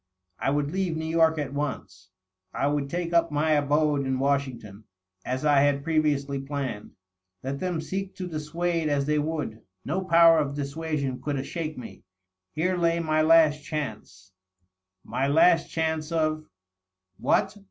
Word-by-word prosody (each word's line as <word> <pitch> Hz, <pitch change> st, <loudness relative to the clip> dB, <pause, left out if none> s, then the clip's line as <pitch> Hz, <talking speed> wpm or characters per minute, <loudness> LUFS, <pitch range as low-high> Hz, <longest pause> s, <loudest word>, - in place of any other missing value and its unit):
I -, -, 0 dB
would 145 Hz, +1 st, 0 dB
leave 185 Hz, -3 st, -1 dB
New 160 Hz, -, -3 dB
York 160 Hz, 0 st, +3 dB
at 140 Hz, -2 st, -3 dB
once; 125 Hz, -11 st, -5 dB, 0.5 s
I -, -, 0 dB
would 145 Hz, -1 st, 0 dB
take 170 Hz, +1 st, -3 dB
up 170 Hz, 0 st, +3 dB
my 150 Hz, +2 st, +1 dB
abode 145 Hz, 0 st, +2 dB
in 130 Hz, -1 st, -1 dB
Washington^ 130 Hz, -7 st, -2 dB, 0.4 s
as 130 Hz, +3 st, -3 dB
I 145 Hz, -2 st, +5 dB
had 140 Hz, 0 st, +2 dB
previously 145 Hz, -3 st, 0 dB
planned. 135 Hz, -6 st, -5 dB, 0.5 s
Let 135 Hz, +1 st, -3 dB
them 180 Hz, -3 st, -2 dB
seek 190 Hz, +4 st, -4 dB
to 185 Hz, -2 st, -5 dB
dissuade 165 Hz, +1 st, -2 dB
as 140 Hz, -1 st, +1 dB
they 150 Hz, +1 st, +1 dB
would; 150 Hz, -8 st, -3 dB, 0.2 s
no 175 Hz, +7 st, -1 dB
power 165 Hz, -2 st, +6 dB
of 140 Hz, -2 st, -2 dB
dissuasion 145 Hz, -2 st, -3 dB
oould 140 Hz, -3 st, -3 dB
shake 155 Hz, -1 st, -5 dB
me. 125 Hz, -, -9 dB, 0.5 s
Here 180 Hz, +4 st, +1 dB
lay 170 Hz, 0 st, +2 dB
ray 155 Hz, -1 st, +1 dB
last 155 Hz, -2 st, +5 dB
chance. 110 Hz, -, -6 dB, 0.7 s
My 135 Hz, -, -1 dB
last 165 Hz, +3 st, +4 dB
chance 160 Hz, -1 st, -2 dB
of.. 155 Hz, -1 st, 0 dB, 0.7 s
what 195 Hz, +2 st, +1 dB
150 Hz, 155 wpm, -26 LUFS, 140-165 Hz, 0.7 s, power